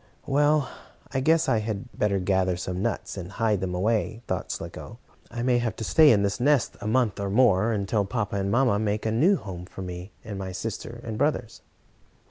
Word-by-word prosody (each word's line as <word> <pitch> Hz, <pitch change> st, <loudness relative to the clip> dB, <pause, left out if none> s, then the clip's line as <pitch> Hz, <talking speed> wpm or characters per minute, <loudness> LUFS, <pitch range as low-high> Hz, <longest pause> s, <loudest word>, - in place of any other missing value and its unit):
"Well, 145 Hz, 0 st, +3 dB, 0.5 s
I 135 Hz, -, +1 dB
guess 160 Hz, +4 st, +3 dB
I 115 Hz, -4 st, +3 dB
had 110 Hz, +2 st, -4 dB
better 100 Hz, -2 st, +1 dB
gather 95 Hz, -1 st, +1 dB
some 90 Hz, 0 st, -4 dB
nuts, 115 Hz, -2 st, -3 dB
and 95 Hz, 0 st, -7 dB
hide 110 Hz, -3 st, +1 dB
them 90 Hz, -1 st, -2 dB
away," 110 Hz, +4 st, 0 dB
thought -, -, -3 dB
Slicko. -, -, -7 dB, 0.3 s
"I 120 Hz, 0 st, -4 dB
may 125 Hz, -1 st, +3 dB
have 115 Hz, -3 st, -2 dB
to 110 Hz, -, -6 dB
stay 150 Hz, +7 st, +6 dB
in 100 Hz, -2 st, +3 dB
this 100 Hz, 0 st, -1 dB
nest 140 Hz, +1 st, +2 dB
a 105 Hz, -, -4 dB
month 110 Hz, -3 st, +1 dB
or 100 Hz, -1 st, -2 dB
more, 110 Hz, -1 st, +4 dB
until 105 Hz, 0 st, 0 dB
papa 105 Hz, -1 st, -2 dB
and 100 Hz, 0 st, -1 dB
mamma 120 Hz, -2 st, +3 dB
make 105 Hz, 0 st, -1 dB
a 110 Hz, -, +1 dB
new 160 Hz, -, +4 dB
home 90 Hz, -, -7 dB
for 95 Hz, -, -8 dB
me, 90 Hz, +2 st, -7 dB
and 100 Hz, -2 st, -6 dB
my 95 Hz, -1 st, -5 dB
sister 115 Hz, +4 st, -5 dB
and 110 Hz, -2 st, -5 dB
brothers." 120 Hz, -6 st, -1 dB
110 Hz, 205 wpm, -26 LUFS, 95-120 Hz, 0.5 s, stay